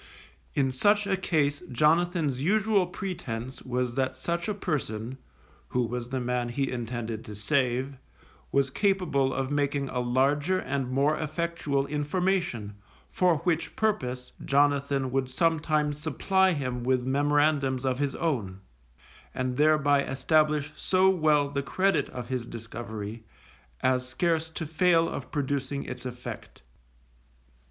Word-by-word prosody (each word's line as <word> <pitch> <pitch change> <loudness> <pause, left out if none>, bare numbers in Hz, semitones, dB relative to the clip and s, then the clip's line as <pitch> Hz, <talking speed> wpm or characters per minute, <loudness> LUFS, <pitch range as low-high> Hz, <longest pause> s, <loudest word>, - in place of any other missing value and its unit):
In 135 -2 +2
such 205 +10 +3
a 200 -1 +1
case 150 -6 +1
Jonathan's 155 0 +2
usual 200 +2 +2
pretence 135 - -5
was 125 -1 -2
that 130 0 0
such 170 +7 -2
a 210 - -1
person 130 - -3 0.5
(who 125 - 0
was 120 +1 -4
the 130 0 -2
man 125 -1 -1
he 135 +2 -1
intended 115 -2 -4
to 105 - -8
save) 130 +4 0 0.5
was 140 -1 +2
capable 180 -9 +1
of 135 +1 -2
making 145 -1 0
a 125 - -2
larger 140 +8 +2
and 135 -7 -2
more 140 +4 +2
effectual 155 -3 -1
information, 150 - -1 0.4
for 180 -3 +3
which 170 -2 0
purpose 130 -13 -1
Jonathan 140 -1 +2
would 130 -1 0
sometimes 150 0 +1
supply 190 +5 +2
him 130 -5 -3
with 125 0 +1
memorandums 140 -1 +2
of 130 0 0
his 145 -1 -1
own, 110 - -2 0.8
and 130 -1 -1
thereby 145 -1 +4
establish 150 +2 +1
so 190 +3 +3
well 155 -5 +3
the 140 0 -2
credit 190 +8 +1
of 125 -2 -6
his 125 -2 -2
discovery, 115 -1 -7 0.6
as 130 0 +1
scarce 160 +3 0
to 160 0 -5
fail 165 +1 +3
of - - -5
producing 140 -1 -2
its 125 0 -6
effect. 125 - -8
140 Hz, 130 wpm, -28 LUFS, 125-160 Hz, 0.8 s, thereby